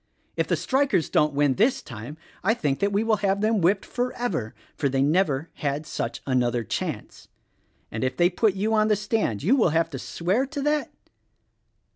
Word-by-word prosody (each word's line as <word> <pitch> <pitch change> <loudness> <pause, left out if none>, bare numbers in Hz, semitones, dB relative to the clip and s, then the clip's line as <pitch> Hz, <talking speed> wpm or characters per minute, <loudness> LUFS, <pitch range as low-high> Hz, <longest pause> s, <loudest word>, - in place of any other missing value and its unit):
If - - 0
the - - +2
strikers 270 - +1
don't 150 -1 +2
win 145 -1 +3
this 225 - +2
time 115 +7 -8 0.3
I 220 +5 +3
think 145 - -1
that 200 0 +1
we 200 +2 +1
will 225 -1 +2
have 200 0 0
them 215 -1 +2
whipped 190 +4 +2
forever; 245 - -3 0.2
for 140 - 0
they 135 0 +1
never 155 -1 +1
had 145 +1 -3
such 150 - -4
another 125 -3 +1
chance. - - -5 0.6
And 110 - -3
if 130 0 -1
they 175 +1 +4
put 200 +2 +2
you 210 +3 0
on 215 -1 +3
the 215 - +3
stand 210 - -1
you 220 - +4
will 225 -10 +3
have 165 +1 +1
to 135 - -5
swear 190 - -1
to 285 0 -5
that?" 295 0 +1
180 Hz, 190 wpm, -25 LUFS, 140-220 Hz, 0.6 s, they